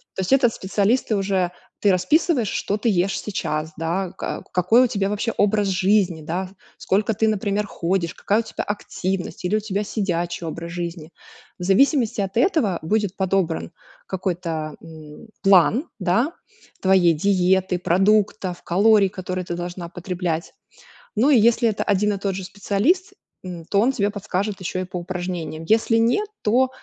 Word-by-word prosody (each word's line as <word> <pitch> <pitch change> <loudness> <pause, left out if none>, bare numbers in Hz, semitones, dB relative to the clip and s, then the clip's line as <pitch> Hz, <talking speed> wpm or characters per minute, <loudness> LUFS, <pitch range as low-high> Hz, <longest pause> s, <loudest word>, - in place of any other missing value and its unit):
То - - -2
есть 185 - -3
этот 255 -4 +4
специалист, 205 +6 +1
ты 220 - +1
уже 190 -2 0 0.3
Ты 205 - +3
расписываешь, 260 - +2
что 200 +1 -1
ты 215 - -2
ешь 195 -1 +1
сейчас, 160 -6 -3
да. 170 +3 -2
Ка - - -5
какой 185 +8 +4
у - - +3
тебя 200 -3 -1
вообще 210 +3 -1
образ 205 0 +2
жизни, 190 -3 +2
да. 175 +5 -3 0.3
Сколько 210 +3 0
ты, 220 +2 +1
например, 210 -1 0
ходишь, 175 -2 -1
какая 205 +2 0
у - - +2
тебя - - -5
активность, 190 -3 -4
или 180 +4 +1
у - - +2
тебя 205 -1 -2
сидячий 175 -5 -2
образ 170 +1 -6
жизни. 170 -2 -5 0.5
В - - -5
зависимости 230 - +3
от 195 +2 -3
этого 245 - +2
будет 205 +2 0
подобран 190 -4 0 0.3
какой-то, 170 -5 -3
м, 160 +2 -12
план, 200 - +4
да, 220 - +1 0.5
твоей 190 -3 +4
диеты, 185 +1 +2
продуктов, 195 0 +1
калорий, 200 +2 +4
которые 185 -1 -4
ты 175 - -4
должна 175 0 -6
потреблять. 175 -2 -4 0.6
Ну, 240 +7 +3
и 280 - +6
если 230 +1 +4
это 210 - -2
один 205 +1 +1
и - - -3
тот 195 -1 -1
же 190 - -5
специалист, 205 - 0 0.3
м, 175 -3 -7
то 200 - +1
он 245 +4 +3
тебе 205 -5 0
подскажет 205 0 -3
еще 185 0 -3
и - - -2
по 180 0 -6
упражнениям. 175 -3 -5
Если 225 +4 +2
нет, 240 - +2 0.2
то 250 +5 +3
195 Hz, 165 wpm, -22 LUFS, 175-215 Hz, 0.6 s, и